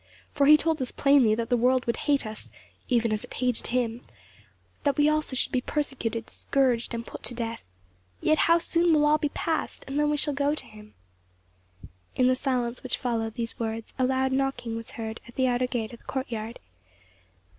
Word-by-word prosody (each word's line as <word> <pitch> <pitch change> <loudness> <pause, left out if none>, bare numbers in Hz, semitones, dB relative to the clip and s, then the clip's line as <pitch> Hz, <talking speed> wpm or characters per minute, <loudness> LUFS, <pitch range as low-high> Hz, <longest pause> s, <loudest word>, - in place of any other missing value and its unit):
for 280 -1 +3
he 305 +1 +9
told 315 -1 0
us 255 - -1
plainly 275 -6 +4
that 230 +1 -3
the 245 - +4
world 250 +1 +2
would 235 - 0
hate 285 -4 +3
us, 215 0 -7 0.4
even 235 -3 +2
as 215 - -2
it - - -12
hated 250 -2 0
him; 240 -1 -1 0.8
that 285 -3 +1
we 295 0 +5
also 305 -3 0
should - - 0
be 255 - +1
persecuted, 250 -6 -2
scourged, 245 -4 0
and 230 0 -5
put - - -9
to 245 - -4
death. 230 -1 -4 0.6
Yet 310 - +2
how 335 - +7
soon 335 0 +2
will 300 -1 +4
all 300 +1 +4
be 295 - 0
past, 320 +2 -2
and 275 +2 -2
then 295 0 +3
we 295 - +1
shall 295 0 0
go 285 +1 +1
to - - -7
him." 215 0 -15 1.2
In 255 - +3
the 255 0 +4
silence 250 -2 -1
which 255 - -3
followed 225 -3 -2
these 230 -1 -4
words 225 -1 -4
a - - +3
loud 265 +1 +1
knocking 260 -3 -1
was 230 0 -6
heard 220 -1 -5
at 235 - -14
the 260 - +2
outer 250 0 +1
gate 235 -3 -3
of 235 - -10
the - - -26
courtyard. 235 -4 -4
255 Hz, 205 wpm, -27 LUFS, 230-285 Hz, 1.2 s, he